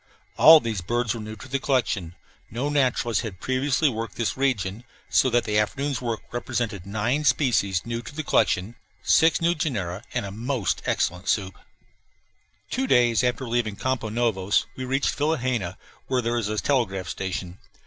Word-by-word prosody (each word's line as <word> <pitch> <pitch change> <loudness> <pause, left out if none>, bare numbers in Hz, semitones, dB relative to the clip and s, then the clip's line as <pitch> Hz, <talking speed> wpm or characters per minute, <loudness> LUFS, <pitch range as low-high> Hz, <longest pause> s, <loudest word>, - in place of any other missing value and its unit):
All 160 0 +9
these 110 -8 -3
birds 120 +4 -1
were 115 - -6
new 110 0 -7
to 105 - -11
the 135 +1 -1
collection 105 - -1 0.3
no 125 +7 -2
naturalists 130 -5 +1
had 105 -6 -7
previously 135 +3 +1
worked 115 -3 -3
this 110 -4 -1
region 115 -6 -1 0.3
so 130 - +4
that 120 0 +2
the 105 0 +1
afternoon's 135 +4 -1
work 115 -3 -2
represented 120 -6 -3
nine 115 +8 0
species 115 - +2
new 115 0 -3
to 120 +5 -11
the 155 - -3
collection, 105 -5 +1 0.3
six 160 0 +4
new 170 +1 +3
genera, 110 - -3
and 120 -4 0
a 100 - -6
most 115 +1 -2
excellent 90 +2 -1
soup. 95 -3 0 1.2
Two 265 +2 0
days 120 - +4
after 125 +1 0
leaving 115 -3 -1
Campos 125 -2 -2
Novos 110 -4 +1
we 130 - -5
reached 135 +2 0
Vilhena, 130 - -1 0.3
where 130 -2 0
there 120 +1 0
is 105 -3 -2
a 110 - -2
telegraph 105 -8 0
station. 95 -1 -4
120 Hz, 170 wpm, -25 LUFS, 105-130 Hz, 1.2 s, All